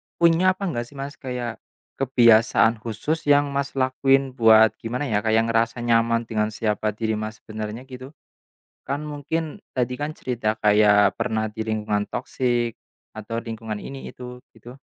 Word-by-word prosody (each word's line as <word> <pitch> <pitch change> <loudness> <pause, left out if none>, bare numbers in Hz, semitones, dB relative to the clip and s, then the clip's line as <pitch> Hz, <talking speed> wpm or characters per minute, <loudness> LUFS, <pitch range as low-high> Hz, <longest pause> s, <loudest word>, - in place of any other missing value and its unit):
punya 170 +2 +4
apa 200 - -8
nggak 120 -5 -3
sih 140 - -18
Mas, 140 +1 -7
kayak, 125 -4 -5 0.3
kebiasaan 115 -3 +4
khusus 120 +9 -3
yang 145 -1 +4
Mas 140 0 -3
lakuin 135 0 +2
buat 110 -3 +6
gimana 125 +5 -3
ya, 110 -6 +1
kayak 110 +1 +2
ngerasa 115 +1 +1
nyaman 115 0 +2
dengan 110 -1 -1
siapa 105 0 -1
diri 110 0 -1
Mas 110 0 -5
sebenarnya, 110 +2 -6
gitu? 130 +3 -11 0.7
Kan 140 +3 -3
mungkin, 155 +5 -4 0.2
tadi 125 0 0
kan 145 +1 -2
cerita 115 -4 -2
kayak 105 -1 +4
pernah 110 0 -1
di 110 +1 -4
lingkungan 105 -1 -1
toxic, 120 -2 -1 0.4
atau 115 +2 -4
lingkungan 110 -2 -6
ini 135 0 -8
itu, 125 0 -10 0.2
gitu. 120 +3 -12
120 Hz, 155 wpm, -23 LUFS, 110-135 Hz, 0.7 s, buat